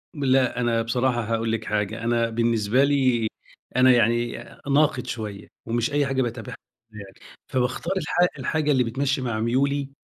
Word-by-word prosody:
لأ. 130 -3 +2
أنا 115 -1 +1
بصراحة 120 +1 0
هاقول 115 0 -1
لك 110 -1 -2
حاجة. 105 +2 -2
أنا 115 0 +1
بالنسبة 115 +2 +1
لي 130 -5 +2 0.5
أنا 130 0 +6
يعني 120 0 +2 0.4
ناقد 145 -3 +2
شوية 105 -4 -6 0.2
ومش 115 +2 -1
أي 145 -1 +2
حاجة 135 -1 0
باتابعها 120 0 -4 0.4
يعني. 100 -2 -11 0.3
فباختار 130 +8 -1
الحا 175 +1 +2
الحاجة 155 -2 0
اللي 130 -2 +3
بتمشّي 135 +3 -1
مع 115 -4 -2
ميولي 140 +4 0
120 Hz, 150 wpm, -24 LUFS, 115-135 Hz, 0.5 s, أنا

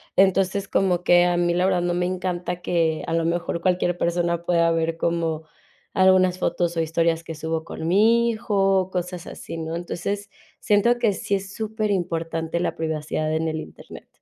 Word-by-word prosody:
Entonces 195 +1 +2
como 180 -2 +1
que 175 0 +5
a 175 0 +2
mí 175 0 +2
la 180 +1 +2
verdad, 185 -2 +2
no 175 0 0
me 180 +1 0
encanta 180 -1 -3
que 165 -3 0
a 165 - -2
lo 165 0 +1
mejor 170 0 -1
cualquier 180 -1 +1
persona 170 -1 0
pueda 170 -1 +3
ver 165 0 0
como, 165 -2 -1 0.5
algunas 185 -1 +4
fotos 170 -1 -1
o - - +2
historias 165 +1 0
que 165 - -7
subo 160 +1 -3
con 160 - -6
mi 225 +6 +4
hijo, 195 -4 +1
cosas 180 -1 -4
así, - - -8
¿no?, 160 0 -4
entonces, 200 +4 -4 0.3
siento 235 +4 +3
que 225 -4 +2
sí 200 - -4
es 195 0 -2
superimportante 175 -7 -2
la 175 - -1
privacidad 155 -1 -2
en 160 +1 0
el 160 0 -2
Internet. - - -11
175 Hz, 175 wpm, -23 LUFS, 165-190 Hz, 0.5 s, que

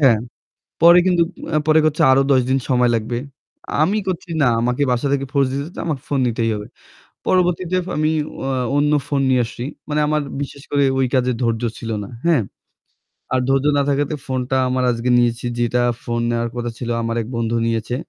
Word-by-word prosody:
হ্যাঁ। 125 -6 +5 0.6
পরে 170 +1 +8
কিন্তু 175 -2 +3 0.3
অ্যা 155 - +2
পরে 155 0 +5
কচ্ছে 155 -1 +1
আরও 135 +1 +5
১০ 130 -1 +5
দিন 135 0 +2
সময় 125 -1 +3
লাগবে। 115 +2 -2 0.7
আমি 195 +6 +1
কচ্ছি, 180 -1 -3
"না। 140 - +4
আমাকে 125 +3 0
বাসা 125 +3 0
থেকে 135 -1 -1
ফোর্স 140 -2 +3
দিতেছে 140 +5 -4
যে - - -7
আমাকে 145 -5 -2
ফোন 140 -2 0
নিতেই 115 -1 0
হবে।" 105 0 -6 0.6
পরবর্তীতে 180 0 +1
আমি 155 +1 +1 0.3
অ্যা 135 - -2 0.3
অন্য 150 +1 +2 0.2
ফোন 140 -2 0
নিয়ে 130 -1 +3
আসছি। 120 +1 -7 0.3
মানে 150 0 0
আমার 150 0 +1 0.2
বিশেষ 140 0 -6
করে 140 -1 +3 0.2
ওই 130 - +3
কাজে 125 -1 +2
ধৈর্য 115 0 0 0.2
ছিল 115 - -6
না, 100 - -9 0.2
হ্যাঁ? 165 -8 +4 0.9
আর 130 - +3
ধৈর্য 135 +1 +2
না - - +3
থাকাতে 145 +2 0
ফোন 130 -1 -2
টা 130 - +3
আমার 130 0 0
আজকে 120 +1 -2
নিয়েছি, 120 0 +1
যেটা 120 +1 +1 0.2
ফোন 120 0 -2
নেওয়ার 120 0 -1
কথা 120 0 -3
ছিল 120 - -5
আমার 115 0 -2
এক 110 - -7
বন্ধু 115 0 -1
নিয়েছে। 115 +1 -1
130 Hz, 195 wpm, -20 LUFS, 120-150 Hz, 0.9 s, পরে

